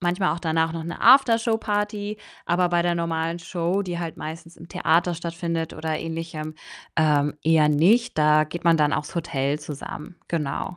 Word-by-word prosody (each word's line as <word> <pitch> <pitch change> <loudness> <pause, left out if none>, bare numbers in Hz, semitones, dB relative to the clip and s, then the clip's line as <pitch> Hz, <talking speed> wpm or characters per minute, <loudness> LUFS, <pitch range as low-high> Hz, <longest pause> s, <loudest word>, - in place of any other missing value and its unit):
manchmal 175 -2 +1
auch 170 - -7
danach 160 -1 0
noch 165 -1 -5
'ne 170 +1 -6
After-Show-Party, 220 -4 +3 0.3
aber 175 +1 +2
bei 175 0 +2
der 175 0 +1
normalen 165 0 -2
Show, 175 +2 -2
die 175 -3 -4
halt 165 -2 -5
meistens 165 +2 -8
im 170 - -12
Theater 170 +2 +1
stattfindet 170 -1 -3
oder 155 0 -3
ähnlichem, 165 -1 -5 0.4
ähm, 150 -2 +3
eher 160 -1 +4
nicht. 180 +9 +3
Da 150 0 +5
geht 170 +2 -7
man 170 -1 +5
dann 150 -2 +2
aufs 150 - -3
Hotel 145 -4 -1
zusammen. 150 +2 -8
Genau. 170 +3 -3
165 Hz, 165 wpm, -24 LUFS, 155-175 Hz, 0.4 s, Da